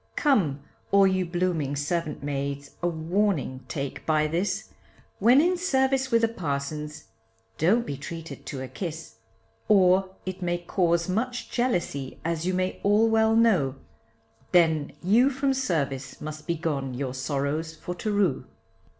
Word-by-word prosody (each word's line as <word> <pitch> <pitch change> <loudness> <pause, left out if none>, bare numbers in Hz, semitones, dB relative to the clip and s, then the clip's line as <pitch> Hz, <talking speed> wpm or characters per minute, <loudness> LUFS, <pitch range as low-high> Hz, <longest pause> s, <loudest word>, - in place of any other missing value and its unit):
Come 185 - +2 0.3
all 200 0 +6
you 185 -1 +1
blooming 170 -5 -1
servant 150 +1 -2
maids 140 0 -3
a 175 - +1
warning 165 -5 0
take 140 -2 -4
by 155 -1 +2
this, 170 +6 -1 0.5
When 240 +6 +6
in 355 +4 +3
service 265 -6 +1
with 230 -2 +3
the - - +6
parsons 150 -6 -4 0.6
don't 215 +9 +3
be 140 - -4
treated 165 +3 -8
to 135 -4 -4
a - - -5
kiss; 160 - -6 0.5
Or 190 -1 +4
it 185 0 -5
may 175 -1 0
cause 170 -1 +1
much 245 +6 -2
jealousy, 175 - -1
as 165 +1 -1
you 185 - +1
may 185 0 -1
all 210 +3 +4
well 220 0 +3
know, 190 - +3 0.8
Then 160 -4 +3
you 230 +9 +5
from 270 0 0
service 140 - -2
must 155 0 -7
be 170 - +1
gone 140 -5 -2
your 130 0 -3
sorrows 145 +4 -2
for 180 - -6
to 210 +4 -3
rue. 200 -9 +1
170 Hz, 150 wpm, -26 LUFS, 145-205 Hz, 0.8 s, all